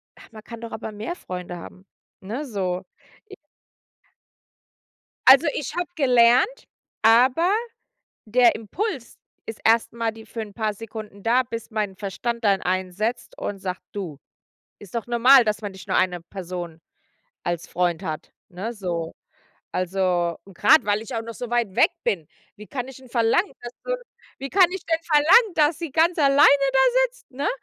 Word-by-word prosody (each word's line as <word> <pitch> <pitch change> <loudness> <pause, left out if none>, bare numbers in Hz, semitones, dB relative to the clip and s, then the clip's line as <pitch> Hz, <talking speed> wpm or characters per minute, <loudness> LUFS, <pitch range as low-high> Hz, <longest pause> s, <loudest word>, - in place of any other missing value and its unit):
„Ach, - - -17
man 215 -1 -12
kann 230 0 -10
doch 230 - -7
aber 220 - -6
mehr 220 +12 -5
Freunde 180 - -7
haben“, 185 +2 -12 0.4
ne, 230 +10 -5
so, 185 -7 -3 0.5
i 395 - -10 1.9
Also, 270 +4 +8
ich 290 - -4
habe 355 -2 -2
gelernt 255 - +3 0.4
aber 255 +10 +5 0.8
der 240 +2 +4
Impuls 260 - -4 0.3
ist 225 - -7
erstmal 230 0 +2
die 220 0 -13
für 230 - -6
'n 210 -2 -8
paar 215 -1 -1
Sekunden 215 -2 -9
da, 240 +3 +3
bis 230 -2 -7
mein 210 -3 -2
Verstand 230 +5 -4
dann 200 -2 +3
einsetzt 185 +5 -2
und 205 - -4
sagt: 185 -1 -5
„Du, 175 -9 -6 0.6
ist 205 +2 -12
doch 230 - -2
normal, 245 +2 +6
dass 210 0 -1
man 205 -2 -5
nicht 190 -1 -13
nur - - 0
1 180 -1 +1
Person 175 -2 -7 0.6
als 175 -1 -3
Freund 175 0 -1
hat“, 155 -2 -5 0.2
ne, 195 +6 -5
so. 175 -6 -4 0.6
Also, 180 -2 0
und 195 -2 -16
grade, 310 - +5
weil 205 0 +1
ich 235 +3 -8
auch 225 - -2
noch 230 0 -8
so 245 +2 -6
weit 235 -5 0
weg - - +5
bin, 165 -6 -1 0.3
wie 210 0 -11
kann 255 +1 -5
ich 265 -1 -11
'n 260 - -16
verlangen, 235 - +1
dass 240 0 -7
du - - -1 0.4
wie 275 - -5
kann 370 -2 +5
ich 380 -2 -6
denn 325 -1 +1
verlangen, 340 +7 +5
dass 300 -1 +2
sie 335 -2 -5
ganz 330 +5 +3
alleine 285 0 +6 0.2
da 265 - +3 0.3
sitzt, - - -23
ne? 275 +2 -2
225 Hz, 170 wpm, -23 LUFS, 190-265 Hz, 1.9 s, Also